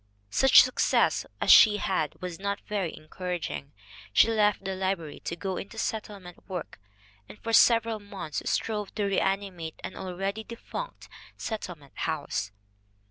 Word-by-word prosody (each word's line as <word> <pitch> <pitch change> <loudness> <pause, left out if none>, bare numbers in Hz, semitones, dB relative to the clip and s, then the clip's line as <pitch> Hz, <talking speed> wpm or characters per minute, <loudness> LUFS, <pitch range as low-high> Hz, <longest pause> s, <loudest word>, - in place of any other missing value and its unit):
Such 270 - +8
success 255 - +2
as - - +4
she 210 -2 +9
had 185 -7 -1
was 180 -1 -5
not 200 +1 -2
very 200 -6 -2
encouraging. 165 -3 -5 0.4
She 110 - +5
left 210 -3 +2
the 190 - -1
library 185 -5 -2
to 170 - -2
go 190 +1 -3
into 210 +3 -7
settlement 205 -5 -5
work, 180 - -6 0.5
and - - -11
for 230 +1 -4
several 230 -1 +5
months 195 -6 -5
strove 210 -3 -2
"to 210 - -1
reanimate 195 -4 -1
an - - -6
already 195 +3 -4
defunct 235 - -7 0.3
settle 210 -5 -4
ment 140 -3 -20
house." 100 +1 -2
195 Hz, 140 wpm, -28 LUFS, 180-215 Hz, 0.5 s, she